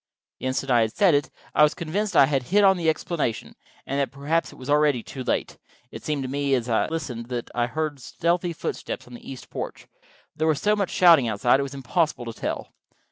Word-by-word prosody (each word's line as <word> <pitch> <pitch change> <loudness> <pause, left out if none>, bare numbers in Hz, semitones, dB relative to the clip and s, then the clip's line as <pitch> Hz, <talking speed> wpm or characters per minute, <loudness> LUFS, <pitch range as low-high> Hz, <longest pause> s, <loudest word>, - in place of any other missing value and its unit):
The - - -3
instant 130 +1 -1
I 120 -1 +5
had 110 0 -1
said 195 -5 +4
it 145 0 +1 0.2
I - - +3
was 150 0 +5
convinced 190 +4 -2
I - - +8
had 135 -1 0
hit 205 +3 +4
on 190 -1 +6
the 170 -3 +1
explanation, 155 -7 -2 0.3
and 140 +1 -2
that 140 - +1
perhaps 145 +4 -1
it - - -14
was 130 - -10
already 145 -4 +3
too 130 - -7
late. - - -2 0.3
It - - -9
seemed 150 -3 -2
to - - -3
me 140 +1 0
as 120 -2 -2
I 115 -2 +1
listened 135 -8 -4
that 120 -2 -5
I 120 0 +1
heard 155 +1 -3
stealthy 170 +6 -1
footsteps 165 - -5
on 125 - -14
the 120 - -9
east 130 - -10
porch, - - -6
but - - -40 0.4
there 160 - +1
was 155 -3 +2
so 210 0 +2
much 200 -3 -1
shouting 165 -8 +6
outside 115 +4 +3
that - - -4
it 140 0 -2
was 140 - -10
impossible 140 0 -1
to 115 - -5
tell. - - -4
140 Hz, 240 wpm, -25 LUFS, 125-165 Hz, 0.4 s, I